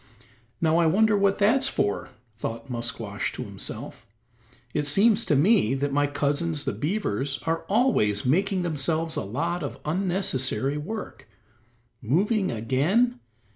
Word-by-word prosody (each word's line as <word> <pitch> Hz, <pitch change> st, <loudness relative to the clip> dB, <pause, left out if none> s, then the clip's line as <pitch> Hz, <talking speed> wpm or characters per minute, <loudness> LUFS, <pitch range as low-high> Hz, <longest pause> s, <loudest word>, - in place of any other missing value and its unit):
"Now 160 Hz, 0 st, +3 dB
I 170 Hz, -1 st, +4 dB
wonder 215 Hz, +6 st, +4 dB
what 200 Hz, -1 st, +2 dB
that's 255 Hz, +7 st, +3 dB
for?" 100 Hz, -, -1 dB, 0.3 s
thought 115 Hz, +4 st, -5 dB
Musquash 115 Hz, -4 st, -3 dB
to -, -, -5 dB
himself; -, -, -8 dB, 0.7 s
"it 145 Hz, -1 st, 0 dB
seems 210 Hz, +8 st, +4 dB
to 150 Hz, -, +2 dB
me 150 Hz, -, +4 dB
that 140 Hz, +1 st, -1 dB
my 145 Hz, 0 st, +2 dB
cousins 145 Hz, +2 st, -1 dB
the -, -, -1 dB
beavers 140 Hz, -, -2 dB
are 165 Hz, 0 st, -1 dB
always 195 Hz, -, +2 dB
making 185 Hz, +7 st, +2 dB
themselves 160 Hz, 0 st, -1 dB
a -, -, -1 dB
lot 170 Hz, -, -2 dB
of -, -, -5 dB
unnecessary 150 Hz, -6 st, 0 dB
work. 205 Hz, -, -7 dB, 0.7 s
Moving 190 Hz, -, +1 dB
again? 150 Hz, -, +1 dB
160 Hz, 135 wpm, -26 LUFS, 135-200 Hz, 0.7 s, I